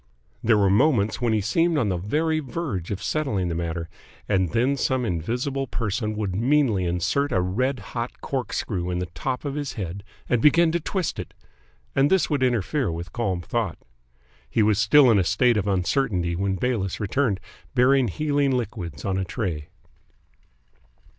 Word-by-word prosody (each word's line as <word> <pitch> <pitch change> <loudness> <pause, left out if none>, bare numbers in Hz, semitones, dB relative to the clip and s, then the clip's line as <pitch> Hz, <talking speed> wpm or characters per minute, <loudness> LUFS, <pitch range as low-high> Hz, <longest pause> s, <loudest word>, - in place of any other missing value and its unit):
There 115 -1 +4
were 100 -2 +3
moments 110 -2 +2
when 120 -2 +2
he 110 -1 +2
seemed 165 - +2
on 115 -8 +1
the 90 - 0
very 155 - 0
verge 125 - -4
of 100 - -4
settling 110 - -1
the - - -2
matter, 85 0 -3 0.4
and 95 -4 +2
then 125 - +1
some 130 -1 0
invisible 125 - -2
person 110 -1 -2
would 105 -4 -2
meanly 120 -4 +2
insert 90 +12 0
a 95 - +2
red 125 +10 0 0.2
hot 120 0 -4
corkscrew 105 -8 -3
in 90 - -1
the 90 - -1
top 130 - -3
of 140 - -2
his 145 -1 -3
head 95 -1 -5 0.2
and 120 -2 +1
begin 160 +4 +5
to 170 - 0
twist 185 +2 -2
it, - - -7 0.6
and 135 +2 +4
this 190 -3 +2
would 145 -3 +1
interfere 125 - +1
with 85 +1 -6
calm 95 -7 -1
thought. 110 0 -2 0.7
He 110 - +2
was 105 -1 +3
still 125 +4 +6
in 105 - +4
a - - +3
state 120 +6 +3
of 105 -1 0
uncertainty 90 -2 0
when 95 +2 0
Bayliss 100 -3 -1
returned, 105 -1 0 0.4
bearing 130 0 +4
healing 140 - +1
liquids 90 - -5
on 95 -1 0
a - - 0
tray. 85 -5 -3
110 Hz, 175 wpm, -24 LUFS, 95-135 Hz, 0.7 s, still